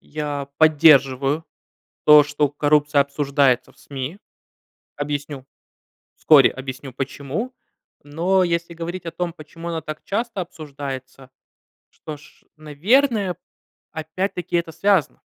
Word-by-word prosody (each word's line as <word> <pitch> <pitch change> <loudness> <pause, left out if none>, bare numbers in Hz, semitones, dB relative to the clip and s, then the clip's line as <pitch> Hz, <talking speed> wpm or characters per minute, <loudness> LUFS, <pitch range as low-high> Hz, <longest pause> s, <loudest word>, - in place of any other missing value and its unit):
я 145 -2 -5
поддерживаю 145 -2 +4 0.6
то, 150 -1 +9
что 145 0 0
коррупция 145 0 +2
обсуждается 140 -2 +1
в - - -29
СМИ. 140 +6 -6 0.8
Объясню, 145 -2 -4 0.7
вскоре 145 -4 +6
объясню, 130 0 -8
почему. 140 - -4 0.5
Но 175 +6 +1
если 170 -1 -1
говорить 170 +2 -6
о 165 - -4
том, 170 +1 -3
почему 165 +1 -9
она 165 -1 -3
так 155 0 -8
часто 220 -1 -2
обсуждается, 140 -6 -8 0.6
что 155 -1 -9
ж, 150 - -20
наверное, 195 - +1 0.6
опять-таки 175 +2 -3
это 170 -1 -2
связано. 180 -1 +1
150 Hz, 110 wpm, -22 LUFS, 140-170 Hz, 0.8 s, то